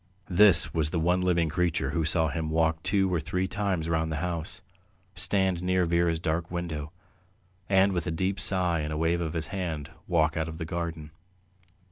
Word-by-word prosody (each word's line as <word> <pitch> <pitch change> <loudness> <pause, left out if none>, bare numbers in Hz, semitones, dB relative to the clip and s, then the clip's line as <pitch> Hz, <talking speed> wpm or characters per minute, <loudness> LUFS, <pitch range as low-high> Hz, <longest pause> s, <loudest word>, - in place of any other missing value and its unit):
This 95 -2 +5
was 80 -2 +1
the 85 - -1
one 90 +3 +2
living 85 -2 +2
creature 85 +2 -1
who 80 -2 -1
saw 80 0 +2
him 80 0 -3
walk 80 0 +1
two 95 -1 +1
or 85 - +1
three 90 +4 -2
times 95 -5 -2
round 80 -1 0
the - - -2
house, 85 +2 -4 0.5
stand 95 -1 +3
near 90 0 +1
Vera's 85 0 +1
dark 80 +1 -2
window, 80 -4 -4 0.8
and 95 0 +4
with 85 -1 -2
a - - -1
deep 95 +4 -1
sigh 90 -4 0
and 75 0 -3
a 75 - -3
wave 85 +2 +1
of 80 -2 -3
his 80 -2 -4
hand 80 -6 -4 0.2
walk 80 -2 +2
out 80 0 -2
of 80 - -8
the 80 - -4
garden. 85 -2 -5
85 Hz, 190 wpm, -27 LUFS, 80-90 Hz, 0.8 s, This